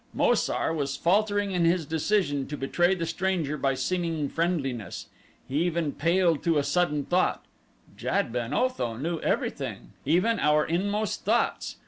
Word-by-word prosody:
Mo - - +4
sar 160 - 0
was 140 -3 -2
faltering 205 +3 +2
in 180 -2 +1
his 170 -1 +2
decision 155 -3 0
to 150 - -5
betray 175 +7 +2
the 170 -2 -3
stranger 165 -3 -1
by 135 -2 0
seeming 165 +2 -1
friendliness. 145 - -2 0.4
He 140 +4 0
even 170 -3 0
paled 170 +1 +2
to 165 -2 +3
a 145 - +2
sudden 150 -1 +1
thought 180 +1 +1 0.5
Jad 115 - -1
ben 120 0 -2
Otho 150 - 0
knew 165 +5 -2
everything, - - -2
even 180 +10 +2
our 150 0 +3
inmost 205 +5 -1
thoughts. - - 0
165 Hz, 150 wpm, -27 LUFS, 145-180 Hz, 0.5 s, Mo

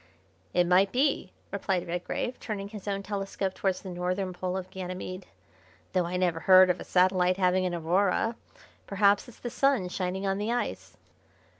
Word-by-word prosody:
"It 180 - +3
might 185 +2 +4
be," 265 -7 +1 0.2
replied 190 -3 -1
Redgrave, 180 +8 -3
turning 200 -3 -5
his 210 -2 -9
own 200 -1 -2
telescope 195 -1 -3
towards 190 -1 -1
the 190 - -6
northern 180 +1 -2
pole 180 +1 -3
of 185 0 -6
Ganymede, 185 0 -6 0.7
"though 180 -2 +2
I 180 +1 -2
never 175 -3 +1
heard 185 +1 +7
of 180 - -4
a - - -6
satellite 185 0 +3
having 185 0 +2
an 175 - -2
aurora. 185 +7 +1 0.5
Perhaps 200 +2 +3
it's 245 - -14
the 240 - -6
Sun 270 -10 +2
shining 185 +1 -3
on 195 0 0
the 210 +3 -1
ice." 245 - -3
185 Hz, 170 wpm, -28 LUFS, 180-200 Hz, 0.7 s, heard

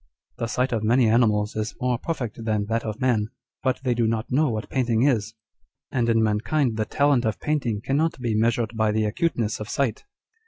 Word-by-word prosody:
The 115 - -1
sight 125 +4 0
of 115 -3 0
many 120 +2 +4
animals 110 -2 +2
is 110 0 -3
more 125 -2 0
perfect 125 -8 -4
than 110 -2 0
that 115 +2 -1
of 110 +1 -5
man, 120 -5 +1 0.3
but 130 -1 0
they 125 -2 +2
do 115 -1 +1
not 110 0 -2
know 145 +3 +3
what 110 -2 -3
painting 120 -3 +1
is; 115 -6 +1 0.6
and 120 -3 +1
in 115 -1 +3
mankind 115 +4 +1
the 110 0 -1
talent 140 0 +2
of 110 -3 -1
painting 130 -9 -1
cannot 145 +5 0
be 120 -3 -1
measured 115 +1 +1
by 110 -1 +2
the 110 0 +1
acuteness 115 -1 -1
of 105 - -6
sight. 135 - -1
115 Hz, 200 wpm, -24 LUFS, 110-130 Hz, 0.6 s, many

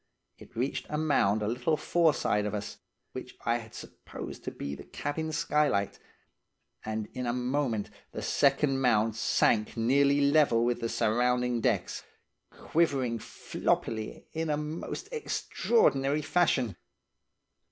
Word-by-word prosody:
It - - -15
reached 125 +4 -2
a 150 - -2
mound 110 -9 +2
a - - -1
little 125 +7 0
foreside 150 -13 +2
of 105 - -3
us, 105 0 -6 0.3
which - - -8
I 115 +1 +2
had 110 -1 -12
supposed - - -9
to - - -1
be 70 - -6
the - - -8
cabin 160 +2 -4
skylight, 150 -10 +1 0.8
and 110 -1 -3
in 125 -1 -3
a 120 - 0
moment 125 -3 -1 0.2
the - - -6
second 135 -1 +2
mound 115 -3 +3
sank 110 -1 +2
nearly 140 +5 +3
level 140 -5 +4
with 120 0 0
the 115 - -2
surrounding 125 +2 +1
decks, 110 -6 0 0.5
quivering 135 -8 0
floppily 110 0 -2
in 160 0 -2
a 150 - +1
most 155 - -5
extraordinary 150 - +1
fashion. 145 - +1
125 Hz, 130 wpm, -29 LUFS, 115-150 Hz, 0.8 s, level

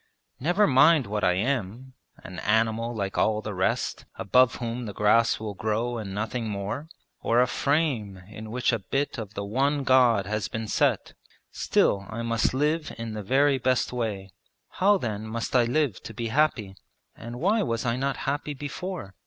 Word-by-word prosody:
Never 175 +9 +3
mind 145 0 +5
what 105 +1 -3
I 90 - +4
am 120 +3 -2 0.3
an 90 -1 -8
animal 110 +2 +1
like 100 -2 -2
all 110 -1 +2
the 105 - -4
rest, 95 0 -1
above 115 +3 +3
whom 120 0 -4
the 105 - -6
grass 115 +2 +3
will 110 -1 -5
grow 110 +4 -2
and 100 -3 -6
nothing 110 +3 -3
more; 105 +10 -4 0.3
or 115 - +2
a 125 - +5
frame 130 -7 0
in 110 +1 -9
which 120 +2 0
a 115 - 0
bit 135 +6 -2
of 105 -2 -7
the 100 - -3
one 140 +7 0
God 125 -6 +4
has 105 +1 -2
been 110 0 -5
set, - - +1 0.4
still 100 0 +1
I 115 +1 -4
must 115 -1 +1
live 150 +3 0
in 115 -1 -5
the 105 - -4
very 135 +6 +2
best 130 0 +1
way. 105 -6 -3 0.4
How 200 +3 +3
then 110 - -4
must 115 +3 -4
I 120 -2 +5
live 130 -3 0
to 115 - -9
be 115 0 -3
happy, 115 -7 +1 0.4
and 120 +2 -8
why 205 - +2
was 115 - -2
I 115 -1 +1
not 135 +2 -1
happy 145 +1 -2
before?' 145 - -6
115 Hz, 180 wpm, -26 LUFS, 105-135 Hz, 0.4 s, mind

